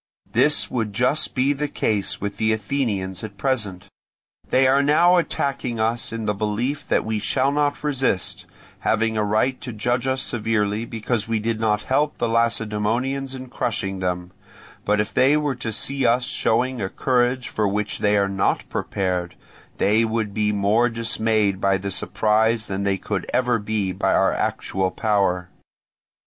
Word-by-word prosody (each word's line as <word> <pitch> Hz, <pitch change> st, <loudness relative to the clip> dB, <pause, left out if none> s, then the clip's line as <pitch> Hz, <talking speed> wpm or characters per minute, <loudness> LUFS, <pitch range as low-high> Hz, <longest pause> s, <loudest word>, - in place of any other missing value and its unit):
This -, -, +3 dB
would 110 Hz, -4 st, -2 dB
just 125 Hz, +8 st, +1 dB
be 135 Hz, +2 st, +2 dB
the 150 Hz, +1 st, -2 dB
case 105 Hz, -7 st, -1 dB
with 100 Hz, 0 st, -4 dB
the 110 Hz, 0 st, +2 dB
Athenians 105 Hz, -5 st, -2 dB
at 105 Hz, -2 st, -8 dB
present. 105 Hz, -7 st, -1 dB, 0.6 s
They 130 Hz, +1 st, +4 dB
are 135 Hz, +2 st, +4 dB
now 170 Hz, +5 st, +5 dB
attacking 135 Hz, -7 st, -1 dB
us 115 Hz, +2 st, 0 dB
in 115 Hz, -1 st, -4 dB
the 105 Hz, -, +1 dB
belief 115 Hz, +8 st, -2 dB
that -, -, +1 dB
we 110 Hz, -1 st, -1 dB
shall 135 Hz, +6 st, +1 dB
not 145 Hz, 0 st, 0 dB
resist, 135 Hz, -10 st, -1 dB, 0.3 s
having 110 Hz, 0 st, +1 dB
a 110 Hz, -, +1 dB
right 110 Hz, +5 st, +1 dB
to 125 Hz, -, -5 dB
judge 120 Hz, +3 st, -1 dB
us 130 Hz, 0 st, 0 dB
severely 110 Hz, -2 st, -1 dB
because 115 Hz, -1 st, -2 dB
we 115 Hz, -1 st, 0 dB
did 110 Hz, +1 st, -2 dB
not 105 Hz, -1 st, +1 dB
help 145 Hz, +3 st, 0 dB
the 120 Hz, -, 0 dB
Lacedaemonians 115 Hz, +4 st, 0 dB
in 130 Hz, -1 st, -8 dB
crushing 95 Hz, -6 st, -2 dB
them; 90 Hz, -1 st, -2 dB, 0.5 s
but 105 Hz, 0 st, +2 dB
if 105 Hz, -, -1 dB
they 140 Hz, +4 st, +4 dB
were 150 Hz, -2 st, 0 dB
to 120 Hz, -3 st, -5 dB
see 135 Hz, +5 st, -3 dB
us 120 Hz, +2 st, +3 dB
showing 125 Hz, -1 st, 0 dB
a 95 Hz, -, -2 dB
courage 125 Hz, +1 st, +1 dB
for 105 Hz, -1 st, 0 dB
which 105 Hz, +1 st, -2 dB
they 105 Hz, 0 st, +3 dB
are 100 Hz, -1 st, +2 dB
not 95 Hz, 0 st, 0 dB
prepared, 90 Hz, -2 st, -2 dB, 0.4 s
they 110 Hz, +3 st, +3 dB
would 110 Hz, -2 st, -1 dB
be 105 Hz, 0 st, +1 dB
more 105 Hz, +4 st, +2 dB
dismayed 110 Hz, -4 st, 0 dB
by 100 Hz, 0 st, +3 dB
the 100 Hz, +1 st, -4 dB
surprise 110 Hz, +3 st, +1 dB
than 95 Hz, -1 st, -3 dB
they 100 Hz, -1 st, +1 dB
could 100 Hz, 0 st, -4 dB
ever 125 Hz, -2 st, +2 dB
be 105 Hz, -2 st, -1 dB
by 90 Hz, -, +1 dB
our -, -, +3 dB
actual 95 Hz, 0 st, -1 dB
power. 95 Hz, -3 st, 0 dB
110 Hz, 170 wpm, -22 LUFS, 105-130 Hz, 0.6 s, now